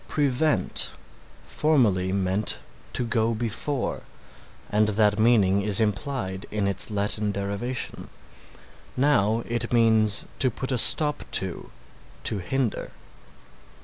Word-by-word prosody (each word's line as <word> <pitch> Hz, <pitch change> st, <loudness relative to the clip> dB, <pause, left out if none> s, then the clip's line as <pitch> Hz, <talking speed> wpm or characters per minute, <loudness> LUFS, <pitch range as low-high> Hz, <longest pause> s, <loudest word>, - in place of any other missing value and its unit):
"Prevent" 145 Hz, +1 st, +1 dB, 0.5 s
formerly 110 Hz, -12 st, +1 dB
meant 95 Hz, +2 st, +1 dB, 0.4 s
to 125 Hz, -, +1 dB
go 115 Hz, 0 st, 0 dB
before, 120 Hz, +4 st, -3 dB, 0.7 s
and 105 Hz, +1 st, +2 dB
that 105 Hz, 0 st, +1 dB
meaning 105 Hz, -4 st, +3 dB
is 105 Hz, 0 st, +2 dB
implied 105 Hz, -2 st, -3 dB
in 105 Hz, -2 st, -2 dB
its 100 Hz, -, -1 dB
Latin 105 Hz, 0 st, -2 dB
derivation. 100 Hz, +6 st, -4 dB, 0.9 s
Now 115 Hz, -5 st, +2 dB
it 120 Hz, 0 st, -2 dB
means 110 Hz, -3 st, +2 dB
to 130 Hz, -, +3 dB
put 130 Hz, +3 st, -6 dB
a 125 Hz, -, +1 dB
stop 150 Hz, +5 st, +6 dB
to, 95 Hz, -3 st, -1 dB, 0.5 s
to 105 Hz, -, +2 dB
hinder. 120 Hz, +5 st, -3 dB
110 Hz, 110 wpm, -24 LUFS, 100-125 Hz, 0.9 s, stop